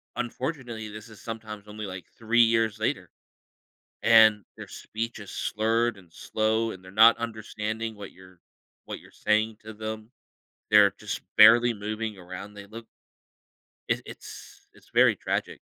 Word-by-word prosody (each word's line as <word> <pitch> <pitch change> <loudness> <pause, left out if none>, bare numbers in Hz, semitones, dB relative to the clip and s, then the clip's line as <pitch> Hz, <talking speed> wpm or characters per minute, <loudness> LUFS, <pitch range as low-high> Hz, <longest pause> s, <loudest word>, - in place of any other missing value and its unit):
unfortunately, 120 -3 -4
this 110 +2 -10
is 110 - -14
sometimes 110 -2 -7
only, 105 0 -7
like, 95 -2 -7
3 115 +1 +3
years 115 -2 +2
later 110 - -2 0.9
and 110 -2 +6
their - - -9
speech 115 +2 -6
is 100 - -10
slurred 115 +1 0
and 90 -4 -18
slow, 110 +3 0
and 95 -2 -11
they're 95 - -13
not 110 +3 +7
understanding 110 -1 -4
what 100 -2 -9
you're 95 0 -17 0.5
what - - -6
you're - - -18
saying 110 +1 0
to 110 - -8
them. 110 +1 -7 0.6
They're 105 -1 +7
just 105 - -5 0.2
barely 120 +2 +8
moving 105 0 -4
around, 90 +3 -9
they 100 -1 -11
look 115 +2 -10 1.0
It - - 0
it's - - -12
it's - - -22
very - - +5
tragic. - - -3
110 Hz, 150 wpm, -26 LUFS, 105-115 Hz, 1.0 s, barely